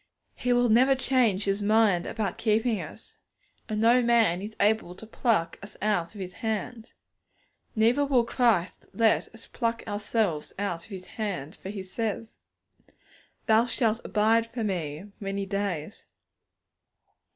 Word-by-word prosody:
He 250 - -2
will 245 0 +3
never 255 +5 +5
change 250 -7 +2
His 200 +1 -1
mind 205 -4 +3
about 210 -5 -3
keeping 220 -1 +1
us, 155 +7 -11 0.5
and 215 -1 -1
no 235 +3 +5
man 230 -7 +3
is 215 +2 -7
able 205 -4 +1
to 220 - -11
pluck 215 -7 0
us 200 - -10
out 205 -3 -1
of - - -9
His 185 -1 -6
hand. 225 +1 -4 0.8
Neither 230 +6 +3
will 270 -4 +3
Christ 230 -7 +1
let 225 -2 +2
us 225 - -13
pluck 230 0 -2
ourselves 205 -5 -1
out 175 -4 -3
of - - -19
His 190 -3 -8
hand, 185 -9 -5
for 190 - -9
He 200 -1 -5
says, 220 +3 -4 1.1
'Thou 225 +2 +4
shalt 230 -1 0
abide 225 +2 +2
for 230 -1 -3
Me 170 -4 -3
many 195 -1 -3
days.' 200 -3 -4
215 Hz, 145 wpm, -27 LUFS, 195-230 Hz, 1.1 s, never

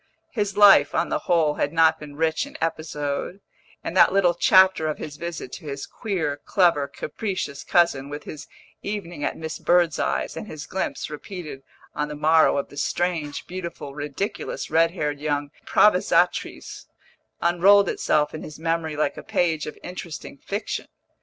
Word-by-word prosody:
His 205 -4 -2
life, 205 -1 +7
on - - +1
the - - 0
whole, 165 -4 +3
had 145 - 0
not 160 0 +4
been 150 -1 -10
rich 160 - 0
in 285 - -11
episode, 155 +1 -3 0.4
and 170 - -4
that - - +6
little 185 -2 +3
chapter 185 -1 +5
of 155 - -2
his 145 - -7
visit 165 -5 -6
to 160 - -9
his 140 -1 -5
queer, 170 -10 -3
clever, 170 -7 +3
capricious 155 0 -4
cousin, 140 -6 +2
with 145 +1 -6
his 150 - -9 0.3
evening 185 -7 -5
at - - -2
Miss 160 -1 -6
Birdseye's, 175 -2 +1
and - - -6
his 155 -5 -7
glimpse, 190 -4 -3
repeated 155 -2 -7 0.3
on 150 - -2
the 150 - -6
morrow, 155 0 +4
of 140 - -2
the 145 - -13
strange, 155 0 -2
beautiful, 170 -6 -7
ridiculous, 150 - -4
red 165 +1 +4
haired 150 -5 -3
young 145 -1 -2 0.2
improvisatrice, - - +2 0.5
unrolled 190 +3 +5
itself 150 -3 +1
in 155 - -6
his 155 - -9
memory 165 -1 -1
like 150 - -1
a - - -6
page 160 -4 0
of 150 - -7
interesting 175 -5 -7
fiction. 200 +9 -4
160 Hz, 160 wpm, -24 LUFS, 150-180 Hz, 0.5 s, life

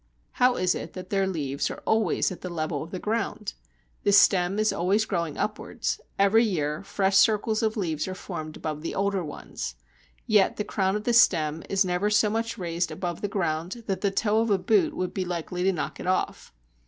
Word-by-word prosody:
How 250 0 +3
is 180 0 +2
it - - -6
that 185 0 -9
their 195 -1 +2
leaves 145 -6 -2
are - - -8
always 220 -6 +2
at 185 - -8
the 180 - -5
level 155 -3 -2
of 160 - -7
the 185 - -5
ground? 215 +1 -2 0.5
The 205 - +2
stem 195 -1 +5
is 215 0 +2
always 195 +5 +1
growing 170 -7 -2
upwards; 210 - -3 0.2
every 200 +4 +5
year 155 -8 -1
fresh 195 0 0
circles 215 +1 +3
of 220 0 0
leaves 160 -6 -1
are 185 - -4
formed 155 -5 -6
above 155 -1 -4
the 165 - -4
older 195 -1 0
ones. 145 - -6 0.5
Yet 210 -3 +3
the 210 - -1
crown 190 -2 0
of 210 - -3
the 240 - +1
stem 160 -9 +4
is 195 0 +2
never 180 +3 0
so 210 0 +3
much 225 +1 -2
raised 170 -2 -2
up - - -5
above 175 -2 -4
the 205 - -1
ground 185 +2 -2
that 195 -2 -2
the 200 - +2
toe 210 +2 +1
of 230 - 0
a 200 - +4
boot 210 +2 +2
would 180 -1 -2
be 190 - -1
likely 180 0 -4
to 195 - +4
knock 175 - -4
it - - -6
off. 185 - -1
190 Hz, 215 wpm, -26 LUFS, 170-210 Hz, 0.5 s, stem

